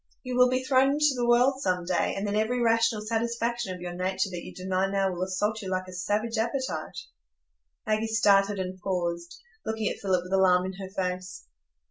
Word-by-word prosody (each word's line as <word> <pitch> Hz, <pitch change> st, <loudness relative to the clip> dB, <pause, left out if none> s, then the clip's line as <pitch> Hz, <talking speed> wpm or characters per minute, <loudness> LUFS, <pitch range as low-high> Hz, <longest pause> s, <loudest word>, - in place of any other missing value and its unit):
You 250 Hz, -1 st, -4 dB
will 250 Hz, 0 st, +6 dB
be 255 Hz, +1 st, 0 dB
thrown 265 Hz, +1 st, +3 dB
into 300 Hz, -1 st, +3 dB
the 240 Hz, -1 st, 0 dB
world 250 Hz, +3 st, +4 dB
some 180 Hz, -4 st, 0 dB
day, 180 Hz, -1 st, 0 dB
and 195 Hz, -, -3 dB
then 205 Hz, 0 st, -1 dB
every 220 Hz, +4 st, +1 dB
rational 230 Hz, -2 st, +2 dB
satisfaction 235 Hz, -2 st, -1 dB
of 180 Hz, -, -12 dB
your 175 Hz, 0 st, -5 dB
nature 190 Hz, +2 st, -1 dB
that 175 Hz, -1 st, -6 dB
you -, -, -8 dB
deny 185 Hz, +1 st, -1 dB
now 195 Hz, -1 st, +1 dB
will 180 Hz, 0 st, -5 dB
assault 205 Hz, +4 st, -1 dB
you 190 Hz, -, -5 dB
like 185 Hz, 0 st, -2 dB
a 185 Hz, -, -9 dB
savage 215 Hz, +5 st, -1 dB
appetite." 260 Hz, +4 st, -2 dB, 0.9 s
Maggie 215 Hz, 0 st, 0 dB
started 205 Hz, -2 st, +3 dB
and 185 Hz, 0 st, -4 dB
paused, 175 Hz, -2 st, -3 dB, 0.3 s
looking 220 Hz, -1 st, -2 dB
at -, -, -6 dB
Philip 185 Hz, -3 st, 0 dB
with 180 Hz, +1 st, -7 dB
alarm 185 Hz, -1 st, +4 dB
in 190 Hz, -, -4 dB
her 190 Hz, -1 st, -6 dB
face. 185 Hz, -1 st, -4 dB
200 Hz, 200 wpm, -27 LUFS, 185-230 Hz, 0.9 s, will